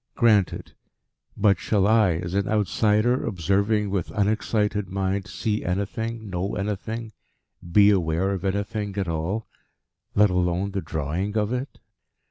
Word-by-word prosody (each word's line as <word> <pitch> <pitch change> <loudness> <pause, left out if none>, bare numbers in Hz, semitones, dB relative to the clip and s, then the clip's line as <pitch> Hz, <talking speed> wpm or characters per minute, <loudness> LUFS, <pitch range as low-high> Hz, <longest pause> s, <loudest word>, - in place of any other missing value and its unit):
Granted. 105 -7 +2 0.6
But 100 -3 +3
shall 100 -3 +1
I, 110 -4 +4
as 85 +2 -4
an 100 0 0
outsider, 110 +3 +2
observing 100 +2 0
with 95 -4 -1
unexcited 105 -1 0
mind, 95 0 -1
see 105 +4 -2
anything, 110 +5 -3
know 95 +1 -3
anything, 110 +3 -4 0.6
be 100 +3 +6
aware 90 0 +1
of 95 -2 -3
anything 100 +1 -2
at 95 -2 -1
all, 85 +7 -2 0.7
let 105 -1 +5
alone 90 +2 0
the 95 -1 -2
drawing 85 +8 -3
of 105 +2 0
it?" 125 +3 -4
100 Hz, 130 wpm, -24 LUFS, 95-105 Hz, 0.7 s, be